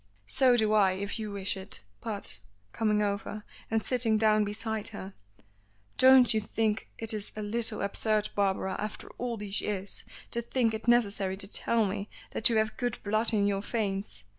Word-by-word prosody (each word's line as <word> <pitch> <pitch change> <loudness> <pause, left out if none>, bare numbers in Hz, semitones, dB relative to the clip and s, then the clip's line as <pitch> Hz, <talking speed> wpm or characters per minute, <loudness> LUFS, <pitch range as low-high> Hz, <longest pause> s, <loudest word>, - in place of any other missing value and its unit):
"So 250 - +4
do 215 -2 +2
I 195 -3 +4
if 200 +4 -4
you 215 -1 -4
wish 200 0 -2
it. 195 +1 -10 0.2
But 200 - -4 0.2
" 100 0 -38
coming 210 -2 +1
over 205 +1 -3 0.3
and 225 0 0
sitting 235 -4 +2
down 215 -1 +4
beside 215 +1 -2
her, 200 -3 -6 0.9
"don't 260 -2 +7
you 220 - +1
think 215 +1 -1
it 225 -1 0
is 210 -1 -1
a 215 - -4
little 220 +1 0
absurd, 210 +1 0
Barbara, 190 -1 0
after 210 0 -6
all 240 -2 -2
these 205 -1 -1
years, 200 -1 -3 0.3
to 235 - -1
think 235 -1 0
it 220 +2 -5
necessary 200 -5 +2
to 195 - -2
tell 225 +2 +2
me 200 +1 -3 0.2
that 225 - +4
you 230 - +2
have 220 0 0
good 245 -3 -2
blood 215 +3 +1
in 205 -3 +2
your 200 -1 0
veins? 195 - -3
215 Hz, 185 wpm, -29 LUFS, 200-225 Hz, 0.9 s, don't